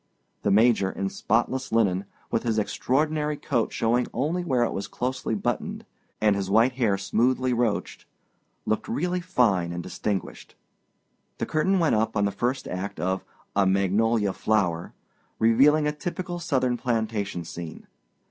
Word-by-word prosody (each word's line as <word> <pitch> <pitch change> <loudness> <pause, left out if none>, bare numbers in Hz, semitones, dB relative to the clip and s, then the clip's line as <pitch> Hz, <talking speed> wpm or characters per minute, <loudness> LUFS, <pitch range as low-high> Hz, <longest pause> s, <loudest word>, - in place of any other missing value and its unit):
The - - 0
Major, 110 -1 +4
in 95 0 -2
spotless 125 +6 0
linen, 100 -4 +2 0.3
with 115 - +1
his 115 -2 -1
extraordinary 150 +7 0
coat 120 -7 -1
showing 120 +2 +1
only 160 +8 0
where 130 -8 +2
it - - -1
was 100 - -4
closely 125 -2 -2
buttoned, 100 - -3 0.3
and 105 -2 +3
his 100 -1 -2
white 115 +5 +4
hair 115 -6 +1
smoothly 125 +5 +1
roached, 115 -3 -1 0.6
looked 110 - -1
really 180 -6 -1
fine 110 - +2
and 85 0 -4
distinguished. 95 +2 -4 0.8
The - - -2
curtain 190 +5 +1
went 165 -4 +2
up 110 0 +1
on 100 - +3
the 100 - 0
first 125 +6 -2
act 90 -1 -5
of 95 +3 -1 0.3
A 100 -1 +4
Magnolia 100 +2 +2
Flower, 90 -6 0 0.4
revealing 140 +7 +4
a 150 - +2
typical 175 +3 -4
Southern 130 -7 0
plantation 110 -7 -2
scene. 85 0 -8
115 Hz, 150 wpm, -26 LUFS, 100-130 Hz, 0.8 s, Major